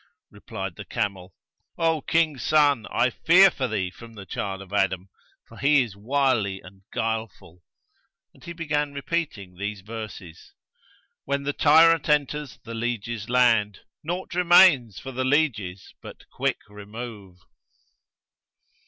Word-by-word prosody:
Replied 95 -2 -7
the 105 - -8
camel, 100 -5 -4 0.4
'O 165 -2 +1
King's 155 -3 +1
son, 145 -6 +3
I 125 +1 +1
fear 185 +7 +5
for 130 -5 -2
thee 100 -5 -2
from 115 +5 -14
the 100 -2 -10
child 95 -1 -4
of 95 0 -12
Adam, 95 -2 0 0.4
for 115 - -15
he 140 -1 +4
is 110 -6 -9
wily 115 -3 0
and 95 +1 -16
guilefull.' 110 -6 -4 0.7
And - - -21
he 170 - -8
began 150 -3 -2
repeating 140 - -4
these 100 0 -4
verses:— 105 -5 -9 0.7
'When 140 0 -1
the 145 +1 -2
tyrant 160 +1 +5
enters 150 -1 0
the 115 - -8
lieges' 115 -1 -4
land, 115 -5 +2
* - - -68
Naught 175 +4 -4
remains 175 - +5
for 135 - -7
the 130 0 -2
lieges 125 - -1
but - - -12
quick - - -1
remove!' 105 -2 -9
120 Hz, 135 wpm, -25 LUFS, 100-145 Hz, 0.7 s, fear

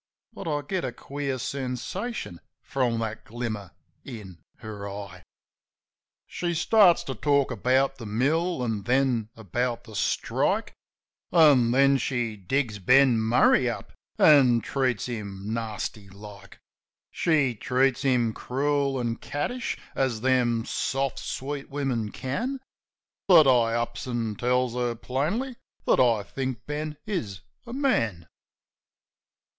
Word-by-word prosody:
But 190 - -8
I 145 -2 -1
get 185 +5 -2
a - - -2
queer 140 -1 -4
sensation 130 - -4 0.2
from 125 -4 0
that 110 0 -4
glimmer 110 -4 -5 0.3
in 100 -9 -9 0.2
her 105 -3 -7
eye. 100 -2 -8 1.0
She 175 -1 -3
starts 180 +1 +5
to 135 - -4
talk 140 +2 +1
about 130 +4 +1
the 115 - -7
mill, 145 +8 0
an' 110 -4 -2
then 125 -1 +1
about 120 +3 -2
the 110 - -13
strike, - - 0 0.6
An' 145 -8 +6
then 135 +2 +4
she 120 -4 -1
digs 105 +2 -2
Ben 125 +4 +5
Murray 120 +2 +4
up 115 - -6 0.2
an' 130 -6 +6
treats 130 -3 -1
him 105 -3 -5
nasty 110 -2 -4
like; 100 0 -12 0.5
She 150 -7 +2
treats 130 +4 +1
him 125 -5 +2
crool 140 +2 -1
an' 120 -1 -2
cattish, 235 +13 -3 0.2
as 125 -5 -1
them 120 -3 +2
soft, 135 -1 -1
sweet 140 +1 -5
women 130 -7 -2
can. 240 - -3 0.7
But 170 -5 +8
I 120 -3 +4
ups 120 +1 -3
an' 115 -3 -2
tells 125 +2 0
her 120 -1 -1
plainly 170 - -2 0.3
that - - +3
I 115 -5 +3
think 130 0 -5
Ben 150 0 -4
is 105 - -4 0.3
a 235 - -7
man. 115 - 0
125 Hz, 125 wpm, -26 LUFS, 115-140 Hz, 1.0 s, But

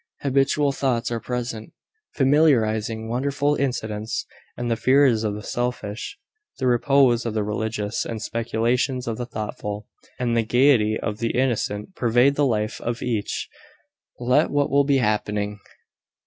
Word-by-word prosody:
Habitual 140 +1 +2
thoughts 125 -4 -1
are 115 - -1
present, 120 -2 -5 0.4
familiarising 115 -7 +2
wonderful 140 +4 0
incidents; 110 -6 -2 0.3
and 120 -1 -2
the - - +3
fears 130 -2 +4
of 105 -2 -1
the 105 - -7
selfish, 120 - -4 0.4
the 130 - -2
repose 125 -1 +3
of 115 -2 -3
the 110 - +1
religious, 105 0 -2
the 115 -1 -4
speculations 115 +3 -1
of 115 -2 -2
the 120 - -4
thoughtful, 105 -2 -5 0.3
and 120 -2 0
the 115 - +3
gaiety 115 -2 +3
of 105 -1 -4
the 115 +1 -1
innocent, 120 - -1
pervade 120 +3 +3
the 145 0 +2
life 110 -3 -1
of 120 0 -3
each, 110 -5 -2 0.7
let 125 +6 +3
what 145 -2 +1
will 140 0 +4
be 140 -1 +3
happening. 105 -3 -1
120 Hz, 145 wpm, -23 LUFS, 110-135 Hz, 0.7 s, fears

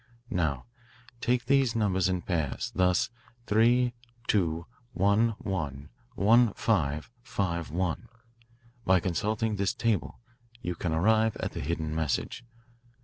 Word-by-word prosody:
"Now, 75 - 0 0.5
take 125 0 +1
these 135 -4 +3
numbers 95 -4 +2
in 90 -1 -1
pairs, 80 -7 -2
thus 90 +1 +2 0.3
3 120 +3 +3 0.3
2; 85 -5 +1 0.3
1 100 +5 +3
1; 75 -7 -4 0.3
1 115 +2 +5
5; 75 -6 0
5 85 -7 -2
1. 90 +6 -2 0.8
By 95 -2 +4
consulting 105 +5 -1
this 100 +5 0
table 115 -3 -1 0.4
you 90 -6 -3
can 85 0 -3
arrive 110 +7 +3
at - - -2
the - - -5
hidden 80 0 -2
message. 80 - -2
95 Hz, 120 wpm, -29 LUFS, 80-110 Hz, 0.8 s, 1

